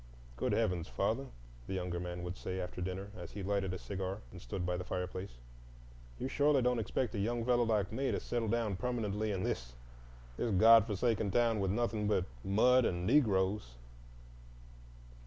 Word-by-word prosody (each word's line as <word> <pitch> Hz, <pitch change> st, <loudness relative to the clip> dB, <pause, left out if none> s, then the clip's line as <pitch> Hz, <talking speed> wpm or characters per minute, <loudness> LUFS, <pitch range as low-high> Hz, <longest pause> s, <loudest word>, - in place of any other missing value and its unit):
"Good -, -, 0 dB
heavens, 90 Hz, -6 st, 0 dB
father," 115 Hz, +7 st, -1 dB, 0.4 s
the 95 Hz, -, -3 dB
younger 90 Hz, -1 st, -2 dB
man 90 Hz, 0 st, -5 dB
would 90 Hz, +1 st, -4 dB
say 95 Hz, 0 st, -4 dB
after 90 Hz, 0 st, -5 dB
dinner, 95 Hz, +2 st, -4 dB
as 85 Hz, -3 st, -8 dB
he 100 Hz, -, -5 dB
lighted 100 Hz, -1 st, 0 dB
a 90 Hz, -, -3 dB
cigar 95 Hz, +1 st, -4 dB
and -, -, -10 dB
stood 90 Hz, +9 st, -4 dB
by 90 Hz, 0 st, 0 dB
the 90 Hz, -, -3 dB
fireplace, 90 Hz, -5 st, -4 dB, 0.8 s
"you -, -, -3 dB
surely 145 Hz, -1 st, +3 dB
don't 125 Hz, -1 st, +2 dB
expect 110 Hz, +2 st, -1 dB
a 105 Hz, -, -2 dB
young 115 Hz, +3 st, -1 dB
fellow 120 Hz, -1 st, +3 dB
like 105 Hz, -4 st, +1 dB
me 135 Hz, +4 st, -1 dB
to -, -, 0 dB
settle 120 Hz, -2 st, -2 dB
down 110 Hz, -3 st, 0 dB
permanently 110 Hz, -3 st, -1 dB
in 95 Hz, -2 st, -1 dB
this—this -, -, -6 dB
God 115 Hz, +3 st, +7 dB
forgotten 110 Hz, 0 st, 0 dB
town 115 Hz, +1 st, +2 dB
with 95 Hz, -1 st, 0 dB
nothing 110 Hz, 0 st, 0 dB
but 100 Hz, -4 st, +2 dB, 0.2 s
mud 125 Hz, +6 st, +4 dB
and 90 Hz, -4 st, -1 dB
Negroes?" 100 Hz, -, +2 dB
100 Hz, 175 wpm, -34 LUFS, 90-115 Hz, 0.8 s, God